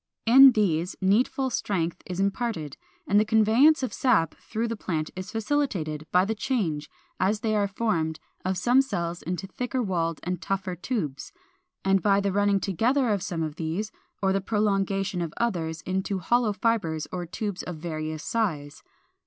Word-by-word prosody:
In 265 +3 +9
these 180 -5 +1
needful 245 +7 +2
strength 175 -7 -1
is 180 0 -4
imparted, 195 - -1 0.3
and 205 +2 +4
the - - +4
conveyance 225 +7 +4
of 255 - -2
sap 215 - +2
through 225 +1 -4
the 230 - -3
plant 160 -7 -3
is 185 0 -6
facilitated, 205 - -1
by 180 +1 +4
the 220 - -1
change, 195 - -2 0.3
as 205 +4 +1
they 215 -1 0
are 205 -1 +2
formed, 170 -7 -1 0.2
of 185 0 -1
some 245 +8 +4
cells 170 -9 -3
into 180 +2 -4
thicker 250 +7 -3
walled 165 -5 -1
and 180 0 -3
tougher 195 -2 -2
tubes, 175 - -4 0.5
and 195 0 +3
by 200 0 +3
the 200 0 0
running 205 0 +2
together 235 - +1
of 205 -3 +1
some 175 -4 -3
of 155 -1 -5
these, 175 +7 -3 0.3
or 190 0 +3
the 195 - 0
prolongation 195 -2 0
of 165 -2 -4
others, 165 -9 -1
into 190 +3 -2
hollow 230 +5 +2
fibres 190 -7 0
or 175 -1 -4
tubes 200 +2 -4
of 180 - -6
various 155 -1 -4
size. 155 -11 -2
195 Hz, 170 wpm, -26 LUFS, 170-220 Hz, 0.5 s, In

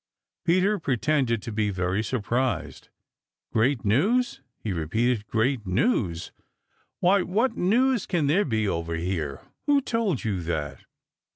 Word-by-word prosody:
Peter 185 +4 +3
pretended 130 -5 0
to 115 - -5
be 105 -1 0
very 90 0 -1
much 110 - -2
surprised. 125 +2 -2 0.6
"Great 115 +2 +2
news!" 200 - +2 0.2
he 105 - -4
repeated. 105 +7 0
"Great 115 -1 0
news! 90 - 0 0.7
Why, 190 +2 +4
what 225 +7 0
news 245 +7 +2
can 170 -5 +1
there 165 +9 +3
be 110 -5 0
over 85 -2 -2
here? 80 -5 -3 0.3
Who 290 -1 +5
told 230 - -1
you 100 -6 -1
that?" 80 -3 -4
120 Hz, 130 wpm, -26 LUFS, -, 0.7 s, Who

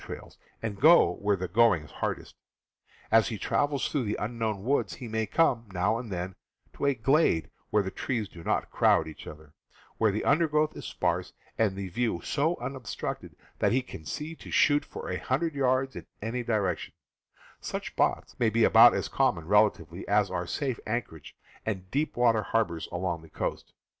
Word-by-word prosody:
trails, - - -9 0.3
and 105 -3 -4
go 165 +5 +7
where 100 0 +1
the 95 -1 -4
going 105 -4 +4
is 75 - -15
hard - - -2
est. - - -15 0.8
As 115 0 +5
he 110 - -3
travels 145 +5 0
through 140 -5 -1
the 105 - -1
unbroken 110 -3 -2
woods 135 +5 0
he 125 - -8
may 110 0 -1
come, 125 -9 +2
now 100 +5 +1
and 115 -4 -7
then, 90 +1 -3 0.4
to - - -3
a 140 - +3
glade 125 - +2 0.2
where 105 -1 +2
the 95 - -4
trees 115 -6 -2
do 85 -3 -12
not - - -1
crowd 80 - +3
each 80 - -10
other, 75 0 -11 0.5
where 110 -2 +4
the 105 - -3
under 160 +4 +4
growth 150 0 +1
is - - -8
sparse, - - -1 0.2
and 105 -4 +1
the 100 -1 -4
view 110 0 -1
so 160 +4 0
unobstructed 125 -2 -5 0.2
that - - +2
he 130 +1 +2
can 85 - -10
see 150 - -5
to - - -12
shoot 145 -1 +4
for - - -8
a 90 - -2
hundred 150 +6 -1
yards 130 -1 +1
in - - -8
any 115 +4 -3
direction; 105 -7 -1 0.6
such - - -4
spots - - 0
may 115 - +3
be 115 +1 +2
about 115 +2 +8
as - - -1
common, 100 -12 +1
relatively, 100 -3 +1
as 100 -2 +2
are 90 -1 -2
safe 130 - -2
anchorages 105 - -4 0.3
and 95 -4 -4
deep 145 0 -1
water 115 -3 +4
harbors 105 -8 -1
along 85 -2 -2
the 80 - -15
coast. - - -4
110 Hz, 190 wpm, -28 LUFS, 95-130 Hz, 0.8 s, about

